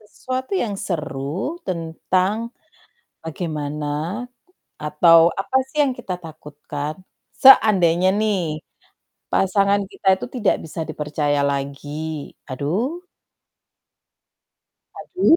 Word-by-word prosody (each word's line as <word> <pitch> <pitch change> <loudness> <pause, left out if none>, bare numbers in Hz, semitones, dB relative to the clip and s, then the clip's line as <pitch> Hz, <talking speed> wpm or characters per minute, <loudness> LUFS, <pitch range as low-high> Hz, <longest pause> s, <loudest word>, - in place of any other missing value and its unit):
sesuatu 255 - -5
yang 225 - -1
seru, 165 - -3
tentang 185 +3 0 0.9
bagaimana, 150 -2 -4 0.9
atau 155 +3 +5 0.2
apa 195 - -3
sih 285 - -12
yang 275 - +1
kita 190 -7 -4
takutkan, 150 -1 -7 0.5
seandainya 185 - +7
nih, 180 -8 -1 0.7
pasangan 200 +1 +2
kita - - -15
itu - - -5
tidak 225 -6 +2
bisa 160 +1 -6
dipercaya 150 -1 -1
lagi, 140 +1 -4 0.5
aduh! 215 - -2 1.9
Aduh. 365 -3 +3
170 Hz, 85 wpm, -21 LUFS, 150-210 Hz, 1.9 s, seandainya